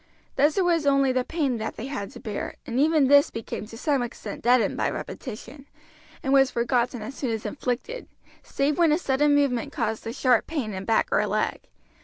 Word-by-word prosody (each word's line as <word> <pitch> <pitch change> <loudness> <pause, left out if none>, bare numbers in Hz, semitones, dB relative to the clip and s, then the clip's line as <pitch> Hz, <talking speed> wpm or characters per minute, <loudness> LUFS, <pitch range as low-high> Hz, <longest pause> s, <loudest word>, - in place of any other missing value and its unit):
Thus 295 +5 +3
it 380 - +3
was 335 -4 +2
only 275 -1 +4
the 255 0 +1
pain 280 -6 -1
that 220 - -4
they 225 - -6
had 265 -8 -4
to - - -10
bear, 215 -5 -5
and 240 +2 -2
even 305 0 +4
this 285 +1 +6
became 225 -1 -6
to 225 - -10
some 280 +1 +1
extent 240 -1 -6
deadened 245 0 +3
by - - 0
repetition, 265 +3 -8 0.6
and 270 - +1
was 270 -1 +5
forgotten 240 0 0
as 225 - -6
soon 270 -2 -3
as 225 -1 -3
inflicted, 275 - -4 0.3
save 285 +4 -1
when 335 -3 +5
a 305 - +4
sudden 290 -2 +2
movement 280 -1 +1
caused 225 -5 -3
a - - -2
sharp 250 -1 +2
pain 270 -10 -3
in 190 0 -5
back 225 - +2
or - - +3
leg. - - -2
265 Hz, 205 wpm, -25 LUFS, 235-290 Hz, 0.6 s, this